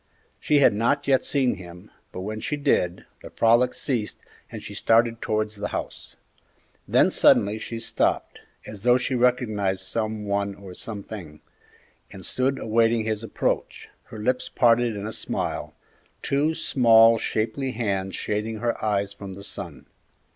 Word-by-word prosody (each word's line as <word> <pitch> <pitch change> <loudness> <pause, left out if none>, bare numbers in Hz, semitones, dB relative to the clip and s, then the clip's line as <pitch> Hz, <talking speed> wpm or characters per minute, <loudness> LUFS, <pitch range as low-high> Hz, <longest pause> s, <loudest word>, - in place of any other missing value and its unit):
She 150 - +2
had 140 -6 +5
not 130 +7 0
yet 135 -2 +3
seen 135 -4 +1
him; 90 -1 -12 0.2
but 90 - -6
when 110 +3 -4
she 150 - -3
did, 95 - 0 0.2
the - - -10
frolic 120 +2 +3
ceased 120 -7 -2 0.3
and - - -8
she - - -8
started 115 0 +2
towards 110 0 -1
the 105 0 -3
house. - - -6 0.7
Then - - +4
suddenly 105 +2 +4
she 115 +1 -6
stopped, 115 - -1 0.3
as 105 -2 -9
though 125 +2 +4
she 130 - -2
recognized 110 -6 +1
some 110 +2 -3
one 100 0 -1
or 95 -2 -11
something, 100 -6 -8 0.7
and 95 -2 -9
stood 135 +1 0
awaiting 115 0 +2
his 110 0 -2
approach, 115 - -2 0.2
her 110 - -11
lips 125 +4 -1
parted 120 -1 +3
in 100 0 -5
a 110 - -4
smile, - - -3 0.5
two 150 +3 +1
small, 115 -5 +5
shapely 125 +6 -2
hands 100 -4 -2
shading 105 +1 -3
her 120 0 -2
eyes 100 -2 0
from 100 -1 -9
the 100 - -10
sun. - - -7
110 Hz, 155 wpm, -24 LUFS, 100-120 Hz, 0.7 s, had